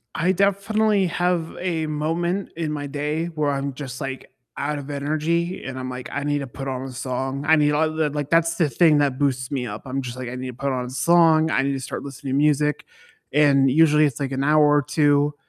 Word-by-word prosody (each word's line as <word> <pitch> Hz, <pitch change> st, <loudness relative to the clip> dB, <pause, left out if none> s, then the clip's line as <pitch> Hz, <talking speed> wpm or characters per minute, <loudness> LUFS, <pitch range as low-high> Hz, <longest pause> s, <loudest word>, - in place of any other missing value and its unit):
I 175 Hz, +3 st, +2 dB
definitely 200 Hz, +2 st, +2 dB
have 175 Hz, -1 st, -1 dB
a 170 Hz, -3 st, -1 dB
moment 165 Hz, +5 st, -2 dB
in 160 Hz, -2 st, -3 dB
my 145 Hz, -1 st, -4 dB
day 150 Hz, +3 st, -2 dB
where 155 Hz, -4 st, -1 dB
I'm 140 Hz, 0 st, -3 dB
just, 130 Hz, 0 st, -7 dB
like, 135 Hz, -2 st, -6 dB, 0.3 s
out 150 Hz, +1 st, -2 dB
of 145 Hz, 0 st, -8 dB
energy 155 Hz, +5 st, -1 dB
and 130 Hz, -1 st, -6 dB
I'm 130 Hz, 0 st, -5 dB
like, 125 Hz, 0 st, -7 dB
"I 145 Hz, -, -3 dB
need 145 Hz, 0 st, 0 dB
to 140 Hz, -, -5 dB
put 135 Hz, +2 st, -7 dB
on 130 Hz, -1 st, -3 dB
a 135 Hz, 0 st, -6 dB
song, 130 Hz, +2 st, -4 dB
I 160 Hz, -, +6 dB
need 150 Hz, -1 st, +3 dB
all 155 Hz, +2 st, +2 dB
the" 155 Hz, -1 st, 0 dB
like, 145 Hz, -1 st, -4 dB
that's 165 Hz, +1 st, +2 dB
the 165 Hz, -2 st, +2 dB
thing 150 Hz, +4 st, +4 dB
that 140 Hz, -3 st, +1 dB
boosts 130 Hz, -2 st, -1 dB
me 130 Hz, -3 st, -2 dB
up, 105 Hz, -2 st, -7 dB
I'm 135 Hz, +1 st, -3 dB
just 125 Hz, -1 st, -7 dB
like, 130 Hz, -1 st, -5 dB
"I 125 Hz, -, -5 dB
need 130 Hz, +1 st, -5 dB
to 125 Hz, -, -6 dB
put 135 Hz, +2 st, -2 dB
on 125 Hz, -1 st, -2 dB
a -, -, -7 dB
song, 160 Hz, +3 st, +4 dB
I -, -, +2 dB
need 140 Hz, +1 st, 0 dB
to 135 Hz, -, -3 dB
start 130 Hz, -, -6 dB
listening 140 Hz, -1 st, -6 dB
to -, -, +1 dB
music," 150 Hz, 0 st, +2 dB, 0.5 s
and 140 Hz, -2 st, +4 dB
usually 150 Hz, +1 st, +5 dB
it's, 140 Hz, -5 st, -2 dB
like, 140 Hz, -1 st, -2 dB
an 135 Hz, +1 st, -1 dB
hour 150 Hz, +1 st, +4 dB
or -, -, +3 dB
2 145 Hz, 0 st, +2 dB
145 Hz, 240 wpm, -23 LUFS, 135-160 Hz, 0.5 s, I